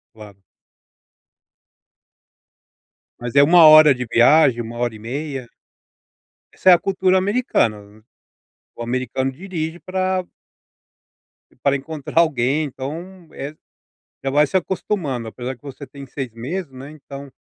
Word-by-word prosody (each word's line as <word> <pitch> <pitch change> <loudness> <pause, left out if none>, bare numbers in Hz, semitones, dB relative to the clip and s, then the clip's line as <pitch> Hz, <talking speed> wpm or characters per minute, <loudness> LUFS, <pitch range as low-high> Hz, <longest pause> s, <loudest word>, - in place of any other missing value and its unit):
Claro. 105 -2 -13 2.8
Mas 120 -1 -6
é 140 - +7
1 165 +2 +7
hora 155 -2 +8
de 125 0 -4
viagem, 125 0 +4
1 115 +1 -8
hora 120 -2 -1
e - - -12
meia. 135 +2 -5 1.1
Essa 190 - +2
é 180 - +10
a 170 - +4
cultura 190 -1 +1
americana. 115 - -1 0.7
O 120 - -6
americano 130 +2 -2
dirige 165 +1 -5
pra 185 0 -2 1.4
Para 140 0 +3
encontrar 150 +2 -3
alguém, 145 -2 +1
então, 165 +7 -8
eh, 145 +3 -7 0.7
já 135 - 0
vai 150 +2 +3
se 190 - -2
acostumando, 170 - -2
apesar 125 +3 -6
que 115 - -36
você 140 0 -9
tem 140 -1 -11
6 130 -2 -6
meses 140 +8 -5
né, 130 +2 -10
então. 140 -2 -11
140 Hz, 125 wpm, -20 LUFS, 125-170 Hz, 2.8 s, é